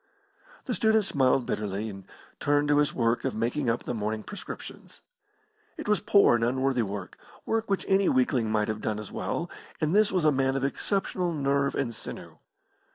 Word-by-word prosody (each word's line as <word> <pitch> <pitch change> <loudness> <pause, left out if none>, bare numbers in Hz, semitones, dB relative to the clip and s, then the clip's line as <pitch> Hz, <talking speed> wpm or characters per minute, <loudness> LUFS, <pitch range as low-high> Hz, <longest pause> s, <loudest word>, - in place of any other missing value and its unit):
The - - -2
student 220 -2 +3
smiled 130 -5 +2
bitterly, 105 +1 -2
and 95 -3 -8 0.3
turned 145 0 +2
to 145 0 +4
his 150 - +2
work 115 -1 0
of 135 - -2
making 120 +4 0
up 115 - 0
the - - -3
morning 110 -1 -2
prescriptions. 205 - -9 0.8
It - - -6
was 210 -2 +3
poor 200 -6 +5
and 120 -1 +2
unworthy 130 +1 +1
work 100 -3 -5 0.3
work 225 -1 -1
which 195 - 0
any 195 -1 +3
weakling 125 -3 +2
might 105 -1 +1
have 110 -1 -3
done 105 - -1
as 105 - -8
well, - - -3 0.3
and 155 +4 +1
this 215 0 +4
was 180 -4 +1
a 155 - +6
man 135 -1 +1
of 135 - -1
exceptional 180 +3 -1
nerve 140 -2 0
and 125 -4 -1
sinew. - - -8
135 Hz, 185 wpm, -27 LUFS, 115-165 Hz, 0.8 s, a